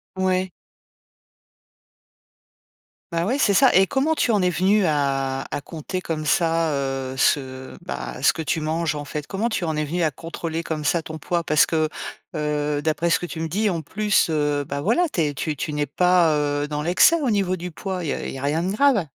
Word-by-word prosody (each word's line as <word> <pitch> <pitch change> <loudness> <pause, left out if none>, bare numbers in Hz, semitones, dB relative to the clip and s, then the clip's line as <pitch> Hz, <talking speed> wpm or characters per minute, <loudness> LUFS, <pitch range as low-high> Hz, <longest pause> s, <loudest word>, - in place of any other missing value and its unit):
Ouais. 185 0 0 2.6
Bah 170 +2 0
ouais, 260 +4 +1
c'est 205 -8 +3
ça 265 +5 +6
et 190 +1 +6
comment 285 - +1
tu 240 - +1
en 205 -3 +2
es 180 - +3
venue 190 +3 +2
à 135 -2 0
à - - -3
compter 170 +5 -5
comme 155 -3 -4
ça, 165 -1 +2
heu, 135 -1 -2
ce, 130 -1 0
bah, 65 -1 -6
ce - - +5
que 160 - -5
tu 160 +1 -1
manges, 155 0 -1
en 145 0 -5
fait? 150 0 -5
Comment 210 +4 -1
tu 185 -6 -2
en 160 -1 -1
es 155 - 0
venue 175 +4 -2
à 160 - +3
contrôler 165 +1 -5
comme 155 -2 -4
ça 165 +2 +1
ton 160 -1 -7
poids? 170 +2 -1
Parce 155 -1 +4
que, 155 -1 +1 0.5
heu, 150 -1 -1
d'après 160 +2 0
ce - - +3
que 175 - -5
tu 160 - -7
me 165 - -2
dis, 205 +6 0
en 165 -3 -2
plus, 210 0 +1
heu, 145 -1 0
bah 140 0 -3
voilà, 230 - +2
tu 170 - +1
es 145 -2 0
tu 155 0 -2
tu 150 +3 -4
n'es 150 0 0
pas, 175 +1 +3
heu, 145 0 0
dans 150 0 -3
l'excès 180 - +5
au 265 - +1
niveau 195 -3 +1
du 180 0 -6
poids, 185 +1 -5
il - - -3
y - - 0
a - - -5
il - - -4
y 135 - -6
a - - -8
rien 150 +4 0
de 190 - -1
grave? 220 - +3
160 Hz, 225 wpm, -23 LUFS, 150-185 Hz, 2.6 s, ça